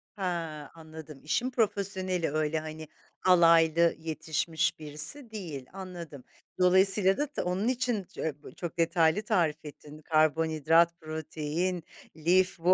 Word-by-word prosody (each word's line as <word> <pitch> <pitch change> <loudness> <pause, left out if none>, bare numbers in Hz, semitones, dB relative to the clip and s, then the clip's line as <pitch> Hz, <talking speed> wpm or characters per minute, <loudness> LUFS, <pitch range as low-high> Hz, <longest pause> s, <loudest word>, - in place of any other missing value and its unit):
Ha, 165 -6 -4
anladım. 160 -2 -11
İşin 245 +11 -1
profesyoneli 190 - -1
öyle 155 0 -1
hani, 155 0 -8 0.4
alaylı 170 -2 +5
yetişmiş 160 +1 -2
birisi 155 - +1
değil, 160 -11 -7
anladım. 175 -8 -9 0.4
Dolayısıyla 190 +1 +5
da 295 - -1
ta 295 - -4
onun 185 +5 -1
için 245 -5 -1
c - - -9
e 150 -2 -4
bu - - -12
çok 175 -1 -6
detaylı 165 +2 +2
tarif 170 -8 0
ettin, 150 0 -11
karbonhidrat, 160 +2 +2
protein, 160 +3 -3 0.3
lif 180 +3 +2
bu 180 +3 +4
165 Hz, 125 wpm, -28 LUFS, 155-185 Hz, 0.4 s, alaylı